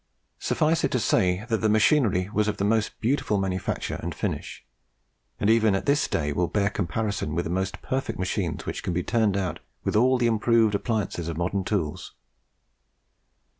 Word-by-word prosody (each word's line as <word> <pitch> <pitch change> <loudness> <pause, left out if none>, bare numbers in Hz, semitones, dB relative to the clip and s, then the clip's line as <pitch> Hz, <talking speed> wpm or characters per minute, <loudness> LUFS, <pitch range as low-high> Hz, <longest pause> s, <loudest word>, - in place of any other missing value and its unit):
Suffice 160 +2 +1
it - - +2
to 125 - +2
say, 95 -1 +1
that 115 - +2
the 110 - +2
machinery 110 -4 +3
was 105 -1 +2
of 105 - -1
the 100 - 0
most 110 0 0
beautiful 115 -3 +1
manufacture 95 -1 -2
and - - -4
finish, - - -4 0.7
and 100 - +1
even 110 -2 +4
at 95 - -2
this 145 +1 +2
day 75 -2 -1
will 85 +3 +1
bear 100 +1 0
comparison 100 +3 -2
with - - -1
the 80 - -3
most 95 +1 -2
perfect 135 +1 -2
machines 90 -3 -2
which - - -4
can 90 - -2
be 90 +1 -1
turned 110 -3 +1
out 95 -2 -2 0.2
with - - -1
all 130 +4 +4
the 120 - +1
improved 115 -1 +3
appliances 100 -5 -2
of 85 -1 -4
modern 95 +3 -1
tools. 90 -3 -3
105 Hz, 180 wpm, -26 LUFS, 90-115 Hz, 0.7 s, even